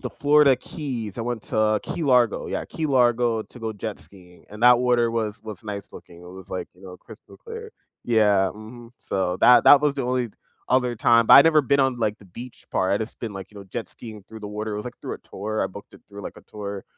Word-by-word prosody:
the - - -5
Florida 145 -2 +4
Keys, 120 - -6
I - - -4
went 120 -1 -3
to 110 -1 +1
Key 170 - -4
Largo. 125 -5 +2
Yeah, - - -3
Key 160 - -4
Largo, 120 -4 +2
to 125 - -16
go 110 -1 -3
jet 100 -8 -6
skiing, 90 +3 -18
and 105 +1 -10
that 125 0 +7
water 120 -2 +2
was 110 -2 -3
was 110 -4 -8
nice 105 -2 -7
looking, 85 0 -13
It - - -13
was 95 0 -12
like, 90 -1 -4
you 90 - -21
know, 90 -1 -10
crystal - - -16
clear. 460 -1 -9 0.3
Yeah. 105 -5 +3
Mhm. 115 +2 -12
So, 90 -2 -2
that 125 - +7
that 145 - +8
was 145 -1 +1
the 135 - -3
only 125 -1 -1 0.4
other 125 -2 +1
time, 115 +1 +4
but - - +8
I'd 140 - +10
never 155 -2 +5
been 140 +1 +2
on, 135 -2 +2
like, 110 -2 -1
the - - -17
beach 120 +7 -11
part. 95 - +1
I'd 100 - +2
just 110 +1 -7
been, 115 -3 -5
like, 95 0 -9
you - - -16
know, 100 - -8
jet 110 +5 -6
skiing 110 -4 -11
through 110 +1 -12
the 105 - -7
water 105 +1 -5
it - - -4
was, 105 - -5
like, 125 -1 -9
through - - -5
a - - -11
tour, 110 +1 -4
I 95 - -1
booked 100 +2 -12
it - - -16
through, 100 0 -10
like, - - -8
a - - -12
tour, 100 -2 -7
110 Hz, 255 wpm, -23 LUFS, 100-125 Hz, 0.4 s, I'd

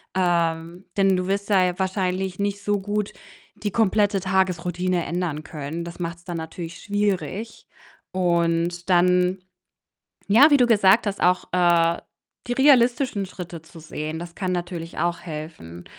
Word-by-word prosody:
Ähm, 170 -1 0
denn 195 -2 +3
du 180 0 -2
wirst 200 +1 -2
da 185 -3 +3
wahrscheinlich 190 -1 -1
nicht 200 0 -2
so 205 0 +1
gut 205 +1 -2 0.4
die 205 -2 -4
komplette 205 -2 +2
Tagesroutine 180 -1 0
ändern 170 -4 -3
können. 155 +2 -6
Das 170 +1 -9
macht's 170 0 -5
dann 175 -2 -5
natürlich 165 +1 -7
schwierig 205 +1 -2 0.5
und 175 0 0
dann, 180 +1 +3 0.9
ja, 260 +10 +7
wie - - +8
du 245 - +5
gesagt 205 0 +5
hast, 200 - -4
auch, 180 0 +3
äh, 170 -2 +3 0.5
die 245 - -2
realistischen 250 -5 +3
Schritte 175 -3 -8
zu 165 0 -14
sehen, 155 0 -5
das 170 0 -8
kann 185 -2 -2
natürlich 175 -2 -5
auch 175 0 0
helfen, 150 - -8
180 Hz, 145 wpm, -23 LUFS, 170-200 Hz, 0.9 s, wie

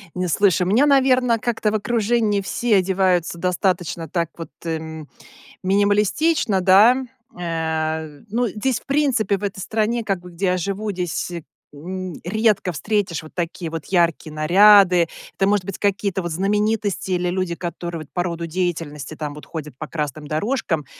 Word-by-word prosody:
Не, 180 0 -1
слушaй. 185 +1 +3
У - - 0
меня, 245 +9 +4
наверно, 255 -4 +3
как-то 225 -2 0
в - - -1
окружении 215 -1 +1
все 220 +2 +1
одеваются 185 -2 +1
достаточно 180 -2 -1
так 170 0 -1
вот, 165 - -7 0.2
эм, 160 -2 -5 0.5
минималистично, 205 - +2
да. 215 +8 +6 0.3
Э 160 -2 -3
ну, 235 +3 0
здесь 225 +4 -1
в - - -27
принципе, 255 -9 +1
в 205 - -11
этой 195 -1 -3
стране, 225 +4 -1
как 195 -4 -2
бы 180 - -12
где 175 +3 -3
я 180 - +2
живу, 200 +4 -2
здесь 180 -2 -3 0.4
н 185 +4 -6
редко 210 0 +1
встретишь 200 -1 -1
вот 155 - -14
такие 170 -1 -3
вот 160 -1 -6
яркие 170 -4 +1
наряды. 180 +2 +6 0.3
Это 195 - +1
может 200 -2 +1
быть 195 -1 -5
какие-то 200 -1 0
вот 175 - -4
знаменитости, 205 +2 0
или 180 0 0
люди, 180 -1 -2
которые 170 -1 -5
вот 150 - -20
по 175 - 0
роду 170 -1 -4
деятельности 160 -4 -3
там 150 -2 -5
вот 150 - -11
ходят 150 -5 -7
по 155 - -5
красным 150 -1 -4
дорожкам. 165 - -1
185 Hz, 165 wpm, -21 LUFS, 165-210 Hz, 0.5 s, да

